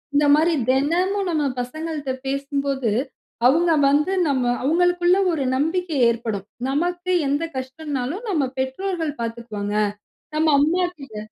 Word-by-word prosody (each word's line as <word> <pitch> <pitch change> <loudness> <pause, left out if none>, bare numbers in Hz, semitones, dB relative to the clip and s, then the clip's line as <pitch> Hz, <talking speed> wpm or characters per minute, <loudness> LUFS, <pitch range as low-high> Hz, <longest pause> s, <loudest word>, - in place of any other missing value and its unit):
இந்த 295 +1 +4
மாரி 330 +3 +3 0.2
தினமும் 360 +9 +1
நம்ம 305 -3 +1 0.2
பசங்கள்ட்ட 300 +1 -4 0.2
பேசும்போது, 275 -3 -1 0.6
அவுங்க 330 +5 +3 0.2
வந்து 300 +7 +2
நம்ம 265 -3 +1 0.2
அவுங்களுக்குள்ள 355 +4 +3
ஒரு 295 -5 -1
நம்பிக்கை 325 +2 -1
ஏற்படும். 225 -4 -3 0.2
நமக்கு 350 +5 -1 0.2
எந்த 285 +4 0
கஷ்டம்னாலும், 275 - -4
நம்ம 295 -9 +1
பெற்றோர்கள் 315 +2 -2
பாத்துக்குவாங்க. 225 -3 -4 0.6
நம்ம 315 +1 +2
அம்மா 345 +5 +2
கிட்ட 270 -6 -10
295 Hz, 115 wpm, -22 LUFS, 265-345 Hz, 0.6 s, இந்த